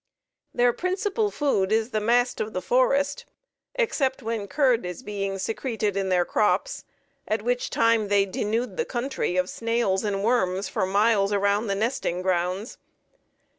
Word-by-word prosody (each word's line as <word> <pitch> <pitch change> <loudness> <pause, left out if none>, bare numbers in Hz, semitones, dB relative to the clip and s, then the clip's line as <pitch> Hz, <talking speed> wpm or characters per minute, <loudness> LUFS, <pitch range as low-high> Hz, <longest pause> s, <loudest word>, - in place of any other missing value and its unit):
Their 245 0 +3
principal 405 - -1
food 245 - 0
is 220 +2 +1
the 215 - 0
mast 245 +3 +2
of 215 - -4
the 185 - -2
forest, 275 +3 +1 0.5
except 295 - 0
when 220 -2 -3
curd 255 -2 +2
is 180 +7 -6
being 195 -2 -3
secreted 215 0 -2
in 195 -1 -1
their 180 -1 +2
crops, 360 - 0 0.4
at 215 -1 -1
which 245 +1 -1
time 230 -2 +2
they 200 -1 +3
denude 220 - -2
the 475 - +1
country 240 -7 -2
of 180 0 +2
snails 230 -3 0
and 200 -2 -1
worms 195 -5 +1
for 190 - -1
miles 200 0 +2
around 200 +2 +1
the 200 - 0
nesting 205 -5 -1
grounds. 185 +4 -1
220 Hz, 155 wpm, -25 LUFS, 195-250 Hz, 0.5 s, Their